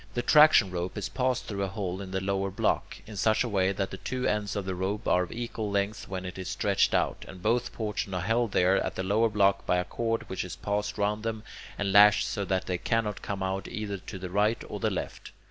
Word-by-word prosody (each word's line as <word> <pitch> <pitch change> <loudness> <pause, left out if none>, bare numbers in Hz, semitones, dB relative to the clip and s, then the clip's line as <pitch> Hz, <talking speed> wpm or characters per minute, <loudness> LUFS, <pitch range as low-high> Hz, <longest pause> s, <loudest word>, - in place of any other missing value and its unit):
The 120 - 0
traction 150 -11 +6
rope 90 +2 -3
is 100 -2 -3
passed 130 +2 0
through 100 -2 -4
a 100 - 0
hole 95 -1 -4
in 95 - -7
the 95 0 -1
lower 100 0 -1
block, 95 - -1
in 110 - -10
such 110 +4 +2
a - - -2
way 95 -3 +2
that 95 0 -2
the 95 - -6
two 125 +7 -3
ends 105 -2 0
of 100 -2 -2
the 95 - -2
rope 95 +4 -3
are 90 - +4
of 90 - -4
equal 115 -2 -4
length 100 +1 -1
when 95 -1 -5
it 90 +1 -7
is 95 - -5
stretched - - +2
out, - - 0
and 95 - -10
both 120 +3 +1
portions 105 -3 -3
are 90 - -1
held 115 +3 +1
there 95 +1 +3
at - - -4
the 95 - -2
lower 110 +4 +2
block 100 -2 +2
by 90 - +3
a 90 - 0
cord 115 +3 -2
which 95 - -3
is 90 - -6
passed 105 +1 -2
round 105 +1 0
them 110 -1 -3 0.3
and 100 -2 -1
lashed 105 0 +7
so 100 - -2
that 95 0 -1
they 90 -1 -2
cannot 110 -1 -1
come 100 -2 -4
out 95 0 -2
either 105 -2 -4
to 95 +1 -8
the 90 -1 -7
right 105 +4 +1
or - - -6
the - - +1
left. - - -5
100 Hz, 250 wpm, -28 LUFS, 95-110 Hz, 0.3 s, lashed